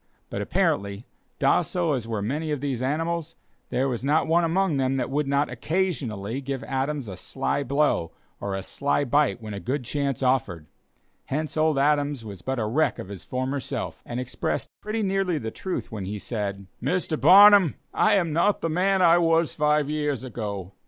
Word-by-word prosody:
But - - -3
apparently 100 +2 0 0.3
docile 170 -4 +2
as 120 -4 -3
were 110 -3 -2
many 150 +8 -2
of 150 -2 -1
these 135 -3 -2
animals, 165 +4 -2 0.3
there 130 +2 +1
was 125 -2 -3
not 150 +3 +2
one 170 +2 +3
among 170 -1 +1
them 135 0 +1
that 125 0 -2
would 145 +1 0
not 140 +1 +2
occasionally 135 - -2
give 135 -1 -4
Adams 135 -1 -2
a 95 - -6
sly 135 +9 -2
blow 140 - +1 0.3
or 100 -1 -3
a 95 - -4
sly 140 +7 0
bite 140 -2 +1
when 105 -1 -6
a 100 - -4
good 130 +8 -2
chance 140 0 -2
offered; 115 -11 0 0.6
hence 155 +3 -3
old 155 -2 +2
Adams 145 -3 +1
was 100 -4 -8
but 130 +5 -2
a 110 - 0
wreck 140 +9 +1
of 95 - -7
his 100 -4 -7
former 130 +2 -2
self, - - -5
and 120 - -5
expressed 125 -1 -3
pretty 215 +1 -2
nearly 195 -3 0
the 110 -6 -4
truth 185 - -5
when 105 -4 -5
he 105 +3 -4
said: 100 -2 -4 0.2
"Mr. 175 -3 -1
Barnum, 200 -3 +8 0.2
I 215 - +4
am 170 -6 +1
not 195 +6 +2
the 165 - -1
man 185 +3 +2
I 170 0 +6
was 165 -1 +2
five 150 -1 +2
years 150 -4 -1
ago. 105 -7 -5
140 Hz, 185 wpm, -25 LUFS, 115-160 Hz, 0.6 s, Barnum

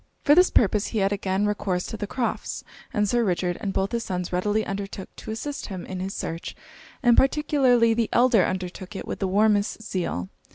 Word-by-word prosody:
For 290 - +6
this 360 +4 +6
purpose 210 -1 +3
he 225 - -4
had 195 -1 +2
again 195 0 0
recourse 195 -3 -1
to - - -5
the 205 -1 -4
Crofts'; 240 +2 -3 0.3
and 210 0 +1
Sir 240 +3 +2
Richard 180 -3 0
and 200 - -2
both 195 +1 -1
his 235 -1 -1
sons 180 -3 -4
readily 210 +4 +1
undertook 195 -1 -6
to - - -9
assist 275 +6 -4
him 190 -4 -6
in 185 -1 -6
his 190 +1 -4
search, 165 +1 -5 0.5
and 240 -2 +6
particularly 265 -5 +4
the 230 -1 0
elder 240 -5 +5
undertook 185 +1 -4
it - - -5
with - - -4
the 195 - 0
warmest 205 +2 +2
zeal. 130 - -3
205 Hz, 200 wpm, -25 LUFS, 190-230 Hz, 0.5 s, For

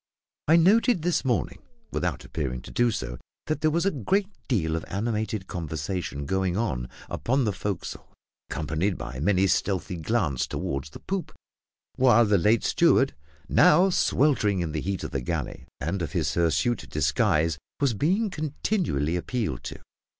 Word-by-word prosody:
I 160 - +6
noted 195 +2 +4
this 175 0 +1
morning, 125 -4 -1 0.3
without - - -2
appearing 65 -6 -4
to - - -10
do 120 - +3
so, 65 - -4 0.3
that 155 -1 -2
there 155 - +4
was 170 +4 0
a 195 - +3
great 190 - 0 0.2
deal 80 - +1
of 80 - -3
animated 110 -1 -2
conversation 80 -3 -4
going 95 +3 0
on 65 - -1 0.2
upon 135 +3 0
the 105 -3 0
forecastle, 100 -1 -5 0.4
accompanied 80 +5 -1
by - - -6
many 95 +4 +3
stealthy 95 -1 0
glances 80 - 0
toward 70 0 -3
the 75 - -11
poop; 190 -2 -3 0.6
while 120 -3 +6
the 100 -2 +3
late 110 +6 +3
steward 135 -5 +3 0.3
now 180 +5 +5
sweltering 130 - +2
in 80 -2 -2
the 75 0 -2
heat 95 +5 -3
of - - -5
the 70 - -2
galley, 60 - -4
and 90 +5 -2
of 80 - -4
his - - 0
hirsute 85 - +1
disguise 75 0 +1 0.2
was 140 -4 +2
being 190 - +1
continually 150 - -1
appealed 100 - -2
to. - - -5
100 Hz, 155 wpm, -26 LUFS, -, 0.6 s, I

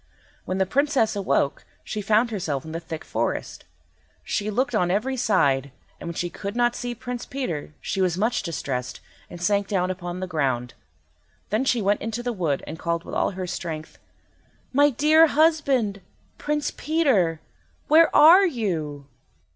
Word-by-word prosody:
When 185 - -2
the 190 - +2
Princess 270 - +1
awoke 190 -8 0 0.2
she 215 - -4
found 220 +4 +2
herself 160 -8 -3
in 160 - -7
the 165 - -3
thick 165 -1 -7
forest. - - -3 0.6
She 210 +1 -2
looked 245 +4 0
on 180 -5 +2
every 220 +8 0
side, 140 - +1 0.3
and - - -8
when 170 - -6
she 175 - -1
could 200 +5 -6
not 240 0 +2
see 245 0 -4
Prince 245 +1 -6
Peter, 165 - -4
she 195 - -2
was 180 -2 +1
much 220 +5 +1
distressed, 135 -7 -4 0.3
and 175 - -9
sank 200 +2 +1
down 185 -2 0
upon 175 -1 -6
the 185 - -3
ground. 130 -8 -1 0.8
Then 220 +5 +1
she 240 -4 +1
went 205 +1 +1
into 225 +2 -4
the 245 0 -2
wood, 165 -9 -1
and 160 - -8
called 170 0 -2
with - - -9
all - - +1
her 185 - -3
strength— 160 -3 -6 0.7
"My 285 +2 +5
dear 305 +5 +5
husband, 280 -10 +2 0.4
Prince 295 0 -1
Peter, 255 - +1 0.5
where 320 +2 +6
are 350 +6 +8
you?" 160 - -3
200 Hz, 165 wpm, -24 LUFS, 170-250 Hz, 0.8 s, are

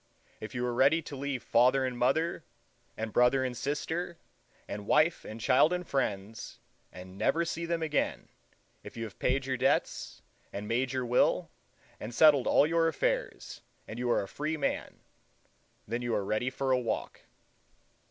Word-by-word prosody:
If 110 - -8
you 120 0 -1
are 120 - -1
ready 140 +7 +3
to 145 - -8
leave 135 -2 -3
father 130 +3 +3
and 125 -1 -3
mother, 135 +8 +1 0.5
and 110 -1 -4
brother 125 +2 +4
and 125 -1 -3
sister, 160 +6 -3 0.5
and 100 0 -6
wife 155 +2 +3
and 110 +1 -8
child 130 +8 +4
and 180 -1 -2
friends, 110 -5 -3 0.3
and 95 +1 -11
never 165 +10 +2
see 170 0 -3
them 165 -1 -1
again,—if 150 -5 -5
you 115 - -3
have 110 -3 -9
paid 130 +1 +1
your 130 -1 -1
debts, - - 0 0.3
and 100 +1 -6
made 125 +3 0
your 130 -2 -2
will, 120 +1 +2 0.5
and 115 +2 -7
settled 145 -4 +6
all - - +5
your 165 +1 +2
affairs, - - -2 0.3
and 110 - -7
are 120 -4 +1
a - - -7
free 155 +6 -3
man; - - -3 0.9
then 115 +3 -2
you 120 -2 -1
are 100 - -1
ready 110 +5 0
for 135 +1 -2
a 130 - +4
walk. 115 -3 -4
130 Hz, 165 wpm, -30 LUFS, 115-155 Hz, 0.9 s, settled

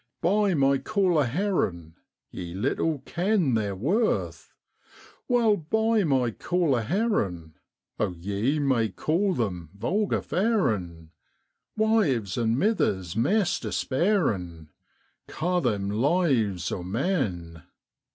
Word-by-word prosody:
Buy 200 +1 +2
my 135 -1 +3
caller 180 -3 +1
herrin'! 120 - -1 0.4
Ye 85 -1 -7
little 140 +7 -1
ken 180 - +1
their 105 -3 -1
worth, 185 - -1 0.8
Wha'll 230 -4 +3
buy 220 +6 +1
my 130 -5 +1
caller 160 -2 0
herrin'? 105 - -1 0.5
Oh 105 - +1
ye 100 - -1
may 130 -6 +1
call 175 - 0
them 90 - -3
vulgar 200 - 0
f - - -8
arin'; 105 - 0 0.7
Wives 175 - +1
and 115 0 +1
mithers, 100 - 0
maist 190 - +1
despairin', 110 - -1 0.6
Ca' 180 +3 -1
them 105 - -1
lives 115 - +1
o' 90 - -3
men.' 90 - -2
135 Hz, 105 wpm, -26 LUFS, -, 0.8 s, my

